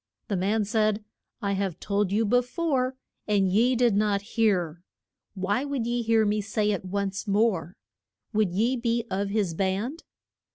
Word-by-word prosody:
The 200 Hz, -, 0 dB
man 205 Hz, +4 st, +1 dB
said, 215 Hz, 0 st, +1 dB, 0.4 s
I 200 Hz, -, 0 dB
have 195 Hz, -3 st, -2 dB
told 200 Hz, -1 st, 0 dB
you 220 Hz, +3 st, +2 dB
be 245 Hz, +4 st, +4 dB
fore, 260 Hz, -1 st, -1 dB, 0.3 s
and 195 Hz, -3 st, +2 dB
ye 240 Hz, +6 st, +3 dB
did 240 Hz, -3 st, +3 dB
not 205 Hz, -1 st, +1 dB
hear. 180 Hz, -8 st, +1 dB, 0.5 s
Why 200 Hz, +6 st, 0 dB
would 280 Hz, -5 st, -2 dB
ye 240 Hz, +1 st, 0 dB
hear 225 Hz, -1 st, +3 dB
me 210 Hz, 0 st, +1 dB
say 210 Hz, 0 st, 0 dB
it 200 Hz, -, -2 dB
once 195 Hz, +1 st, -3 dB
more? 200 Hz, -4 st, +1 dB, 0.6 s
Would 210 Hz, -4 st, +2 dB
ye 225 Hz, +8 st, +1 dB
be 235 Hz, -1 st, 0 dB
of 195 Hz, +1 st, -1 dB
his 200 Hz, -5 st, 0 dB
band? 200 Hz, -, -2 dB
210 Hz, 165 wpm, -26 LUFS, 195-230 Hz, 0.6 s, be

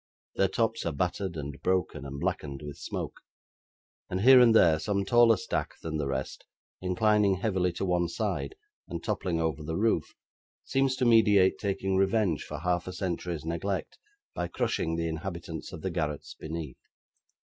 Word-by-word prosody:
Their 95 Hz, -, +3 dB
tops 115 Hz, +3 st, 0 dB
are -, -, 0 dB
battered, 90 Hz, +3 st, -2 dB
and 70 Hz, -1 st, -6 dB
broken, 90 Hz, -6 st, -1 dB
and 70 Hz, +1 st, -6 dB
blackened 70 Hz, 0 st, -3 dB
with 75 Hz, -1 st, -7 dB
smoke; -, -, -5 dB, 0.9 s
and, 90 Hz, +1 st, -2 dB
here 130 Hz, +3 st, +9 dB
and 120 Hz, -2 st, +6 dB
there, 80 Hz, -7 st, +6 dB
some 100 Hz, +2 st, -1 dB
taller 120 Hz, 0 st, +5 dB
stack -, -, -3 dB
than 80 Hz, -1 st, -3 dB
the 75 Hz, -2 st, -2 dB
rest, 65 Hz, 0 st, -4 dB, 0.4 s
inclining 100 Hz, +2 st, +3 dB
heavily 95 Hz, -2 st, 0 dB
to 90 Hz, -, -3 dB
one 90 Hz, -1 st, +1 dB
side, 105 Hz, -, -3 dB, 0.3 s
and -, -, -6 dB
toppling 85 Hz, -3 st, -1 dB
over 80 Hz, -2 st, -1 dB
the 80 Hz, +2 st, -3 dB
roof, 105 Hz, -7 st, 0 dB, 0.5 s
seems 135 Hz, -1 st, +1 dB
to 130 Hz, -, 0 dB
meditate 105 Hz, -5 st, +5 dB
taking 95 Hz, -1 st, -1 dB
revenge 95 Hz, -3 st, +2 dB
for -, -, -6 dB
half 90 Hz, 0 st, 0 dB
a 90 Hz, -, -5 dB
century's 90 Hz, -3 st, -3 dB
neglect, 85 Hz, +4 st, -3 dB, 0.3 s
by 85 Hz, -, -2 dB
crushing 80 Hz, -1 st, -1 dB
the 85 Hz, 0 st, -1 dB
inhabitants 85 Hz, 0 st, -5 dB
of -, -, -9 dB
the -, -, -1 dB
garrets 75 Hz, -1 st, -3 dB
beneath. 80 Hz, -4 st, -6 dB
90 Hz, 165 wpm, -29 LUFS, 80-100 Hz, 0.9 s, here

